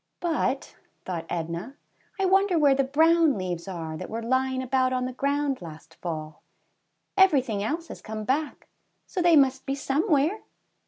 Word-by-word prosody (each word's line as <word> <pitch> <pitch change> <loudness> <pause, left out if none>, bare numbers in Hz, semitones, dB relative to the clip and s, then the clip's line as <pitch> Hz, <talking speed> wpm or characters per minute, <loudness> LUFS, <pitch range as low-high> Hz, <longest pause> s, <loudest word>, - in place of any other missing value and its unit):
'^But," 315 -5 -1 0.3
thought 170 -3 -4
Edna, 170 - -4 0.4
wonder 385 -1 +3
where 290 -3 +5
the 275 0 +2
brown 315 +1 +4
leaves 180 -1 -4
are 165 -4 -5
that - - -7
were 230 +1 -4
lying 260 +2 0
about 255 0 +1
on 255 0 0
the 255 - -4
ground 280 -1 -1
last 160 -1 -11
fall. 155 -3 -5 0.7
Everything 270 - +3
else 320 +11 -2
has - - -9
come 215 0 -6
back, 285 +6 -2 0.4
so 365 - -3
they 345 -1 +5
must 270 -1 +3
be 275 - 0
somewhere." 300 +6 +1
265 Hz, 155 wpm, -26 LUFS, 200-300 Hz, 0.7 s, where